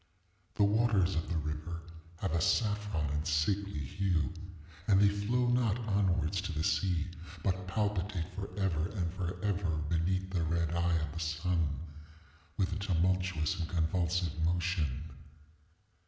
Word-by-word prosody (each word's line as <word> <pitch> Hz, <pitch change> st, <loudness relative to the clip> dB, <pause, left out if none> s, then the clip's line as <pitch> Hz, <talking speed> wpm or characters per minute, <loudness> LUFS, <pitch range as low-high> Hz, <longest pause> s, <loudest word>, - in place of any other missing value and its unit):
ŌĆ£The 100 Hz, -, +4 dB
waters 105 Hz, -4 st, +3 dB
of 80 Hz, -, -2 dB
the 85 Hz, -, 0 dB
river 75 Hz, +2 st, -3 dB, 0.4 s
have 95 Hz, -, 0 dB
a 85 Hz, 0 st, +1 dB
saffron 105 Hz, -7 st, +1 dB
and 75 Hz, +2 st, -1 dB
sickly 95 Hz, +6 st, +1 dB
hue; 85 Hz, +4 st, 0 dB, 0.5 s
and 100 Hz, -3 st, +6 dB
they 100 Hz, -, +7 dB
flow 105 Hz, +5 st, +1 dB
not 120 Hz, -3 st, +2 dB
onwards 95 Hz, -3 st, +1 dB
to 95 Hz, -2 st, -3 dB
the 80 Hz, -1 st, -1 dB
sea, 90 Hz, -2 st, +1 dB, 0.4 s
but 95 Hz, -1 st, 0 dB
palpitate 100 Hz, -3 st, -1 dB
forever 95 Hz, -3 st, -1 dB
and 85 Hz, -4 st, -1 dB
forever 95 Hz, -2 st, -1 dB
beneath 95 Hz, +3 st, 0 dB
the 90 Hz, -3 st, 0 dB
red 85 Hz, 0 st, +1 dB
eye 85 Hz, 0 st, +2 dB
of 80 Hz, -, -3 dB
the 85 Hz, -, -5 dB
sun 80 Hz, -2 st, 0 dB, 0.8 s
with 95 Hz, 0 st, +1 dB
a -, -, -2 dB
tumultuous 95 Hz, -2 st, +1 dB
and 85 Hz, -, -2 dB
convulsive 85 Hz, -1 st, 0 dB
motion. 85 Hz, -5 st, 0 dB
90 Hz, 140 wpm, -32 LUFS, 80-100 Hz, 0.8 s, they